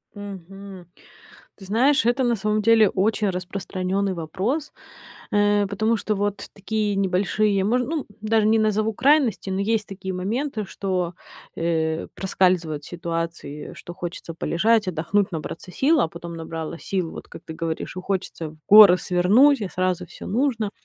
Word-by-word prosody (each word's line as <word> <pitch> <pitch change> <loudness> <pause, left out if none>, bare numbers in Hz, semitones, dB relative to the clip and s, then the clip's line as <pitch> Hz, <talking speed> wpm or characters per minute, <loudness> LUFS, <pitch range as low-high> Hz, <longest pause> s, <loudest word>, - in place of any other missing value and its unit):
Мгм. 195 -2 -9 0.7
Ты 195 - -13
знаешь, 240 +6 +3
это, 245 +2 +2
на 240 -1 +2
самом 215 +1 0
деле, 220 -2 +5
очень 210 +1 +1
распространённый 185 +1 -2
вопрос, 195 - -3 0.6
э, 205 0 +3
потому 215 +3 0
что 215 0 -2
вот 205 0 -2
такие 210 0 -2
небольшие, 195 +1 +1
мож 245 +5 +2
ну, 300 +3 -3 0.2
даже 215 0 +2
не 220 +1 +4
назову 215 0 +1
крайности, 255 -5 +2
но 190 +1 -1
есть 215 +1 0
такие 190 -1 -6
моменты, 220 +5 -2
что, 185 -3 -3 0.4
э, 160 -1 -1
проскальзывают 180 -6 0
ситуации, 165 -3 -5
что 175 - -10
хочется 170 -1 -6
полежать, 210 +5 +1
отдохнуть, 185 +4 0
набраться 165 +2 -6
сил, 295 - +2
а 165 - +2
потом 170 0 -8
набралась 165 0 -6
сил, 185 -4 -2
вот - - -10
как - - -11
ты - - -7
говоришь, 165 +1 -4
и - - -3
хочется 185 -4 -3
в 155 - -16
горы 205 -3 +10
свернуть, 215 +11 +4
и 200 - -3
сразу 185 -1 -1
всё - - -11
нужно. 225 -2 0
195 Hz, 155 wpm, -23 LUFS, 180-215 Hz, 0.7 s, горы